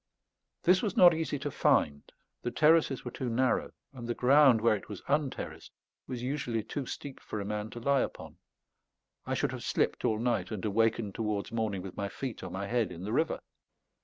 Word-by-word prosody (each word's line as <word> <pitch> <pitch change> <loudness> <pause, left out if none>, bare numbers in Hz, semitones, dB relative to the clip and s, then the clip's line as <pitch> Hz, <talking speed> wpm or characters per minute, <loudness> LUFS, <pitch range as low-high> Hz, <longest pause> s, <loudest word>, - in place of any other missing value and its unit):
This 180 +1 +5
was 205 -4 -2
not 175 -2 +9
easy 160 -2 -2
to 145 +1 -4
find; 70 - +1 0.3
the - - -2
terraces 150 0 +3
were 120 - -4
too 125 0 -3
narrow, 125 +3 +1 0.2
and 120 -3 -7
the 120 - -1
ground, 135 -2 +6
where 110 -1 +4
it 105 - -8
was 100 -3 -7
unterraced, 145 -1 -2 0.4
was 125 -2 -5
usually 125 -4 -2
too 140 +4 -5
steep 140 -2 -7
for 105 - -6
a 100 - -4
man 105 +1 -3
to 120 - -8
lie 140 +2 +2
upon. - - -5 0.9
I - - 0
should - - 0
have - - -6
slipped - - 0
all 110 - +2
night, 120 +1 0
and 110 -3 -4
awakened 110 0 +1
towards 105 -2 -2
morning 110 -5 -2
with 95 - -8
my 100 -1 -2
feet 130 +1 -5
or - - -6
my 95 +3 -4
head 115 -2 0
in 85 +1 -8
the 105 +3 -3
river. 160 +5 +1
120 Hz, 200 wpm, -30 LUFS, 105-140 Hz, 0.9 s, not